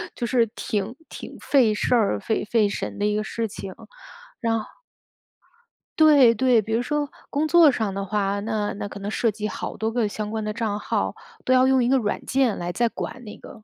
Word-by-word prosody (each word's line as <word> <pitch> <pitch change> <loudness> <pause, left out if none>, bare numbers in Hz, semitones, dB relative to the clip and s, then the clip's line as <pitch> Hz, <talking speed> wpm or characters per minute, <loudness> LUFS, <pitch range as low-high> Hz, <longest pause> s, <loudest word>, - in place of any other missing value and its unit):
就 235 - -3
是 240 -1 +3
挺 210 +2 -3
挺 - - -9
费 250 -7 +3
事 210 - +1
儿、 205 - +2
费 220 - -2
费 215 -1 +2
神 200 - -5
的 205 - +1
一 210 0 +1
个 215 - -1
事 225 +1 -3
情。 195 -2 -8 0.7
然 225 -2 0
后 215 - -7 1.3
对， 290 -7 +7
对， 245 0 +3
比 220 +2 -4
如 230 - +2
说 295 +3 -1 0.2
工 300 +2 0
作 330 -2 +6
上 220 -6 -2
的 195 +1 -3
话， 200 0 -1
那 210 0 -2
那 205 - -5
可 200 - -9
能 200 +1 -4
涉 230 +1 +1
及 210 0 -3
好 - - -6
多 220 0 -1
个 230 -2 0
相 210 0 -5
关 220 -1 -3
的 210 - -2
账 210 -1 -2
号， - - -2 0.3
都 255 - +3
要 255 0 +5
用 265 -1 +3
一 - - +1
个 265 +2 +4
软 210 -5 -2
件 260 -5 +1
来 175 0 -3
再 235 +6 +1
管 250 +2 -6
那 210 -2 -10
个 220 - -13
220 Hz, 235 characters per minute, -24 LUFS, 210-250 Hz, 1.3 s, 对